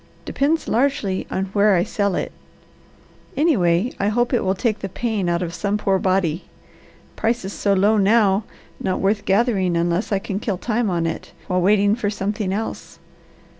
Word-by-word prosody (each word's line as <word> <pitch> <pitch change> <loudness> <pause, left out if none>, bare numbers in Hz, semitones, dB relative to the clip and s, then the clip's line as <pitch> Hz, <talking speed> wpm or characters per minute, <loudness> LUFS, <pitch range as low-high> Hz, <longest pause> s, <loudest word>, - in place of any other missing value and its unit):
Depends 310 +4 0
largely 230 -7 0
on 190 - -1
where 205 -1 +4
I 175 - +3
sell 200 -1 -1
it. - - -3 1.1
Anyway, 225 - +2
I 200 - +1
hope 240 +4 +1
it 240 - +2
will 190 0 +1
take 215 +1 -1
the 195 - -5
pain 210 -3 -2
out 170 +1 0
of 170 -1 -5
some 200 +4 -1
poor 195 -2 +1
body. 185 -3 0 0.7
Prices 220 -4 -1
so 200 - +1
low 205 +3 +3
now, 205 0 +3 0.4
not 185 - -1
worth 205 +2 0
gathering 195 -4 +2
unless 170 +5 0
I 200 - +3
can 195 0 -4
kill 205 -3 -2
time 230 +2 -1
on 170 -2 0
it 165 - -5
while 180 -1 0
waiting 205 +2 +4
for 215 -2 -1
something 205 -1 -2
else. 215 +3 -5
200 Hz, 170 wpm, -21 LUFS, 185-220 Hz, 1.1 s, where